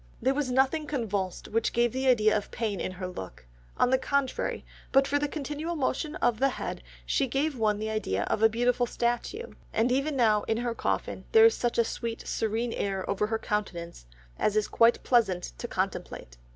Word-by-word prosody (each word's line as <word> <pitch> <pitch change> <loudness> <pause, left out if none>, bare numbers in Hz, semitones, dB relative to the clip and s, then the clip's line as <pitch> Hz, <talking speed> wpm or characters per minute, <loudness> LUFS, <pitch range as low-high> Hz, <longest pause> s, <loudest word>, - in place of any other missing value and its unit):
"... - - -29
There 265 +2 +3
was 280 -2 -1
nothing 265 +4 +2
convulsed 205 - -3
which 225 +1 0
gave 240 0 +2
the 260 +1 -1
idea 215 -4 +4
of 205 - -2
pain 215 -4 -2
in 185 - -3
her 185 0 -6
look; 95 - -8 0.3
on 250 - +3
the 260 - +4
contrary, 280 -1 -1 0.3
but 270 0 +4
for 285 - +1
the 290 - 0
continual 300 +3 -4
motion 300 +2 -1
of 230 -2 +1
the 275 - +4
head, - - -5 0.2
she 275 - +1
gave 280 +4 0
one 215 -3 +1
the 215 +1 -3
idea 100 - -1
of - - -1
a 225 - +7
beautiful 245 +2 +1
statue, 240 - -2 0.2
and 235 +3 +1
even 275 +3 +1
now 220 -5 +4
in 225 - +1
her 240 0 -1
coffin, - - -2
there 445 0 +8
is 455 - +6
such 240 -1 -1
a 235 - +5
sweet 230 0 -5
serene 225 +2 -1
air 195 -2 -2
over 200 +1 0
her 225 +1 0
countenance 175 - -4 0.3
as 210 - +1
is 215 - +2
quite 230 +1 +3
pleasant 195 - +2
to - - -4
contemplate." - - -4
235 Hz, 205 wpm, -28 LUFS, 210-270 Hz, 0.3 s, there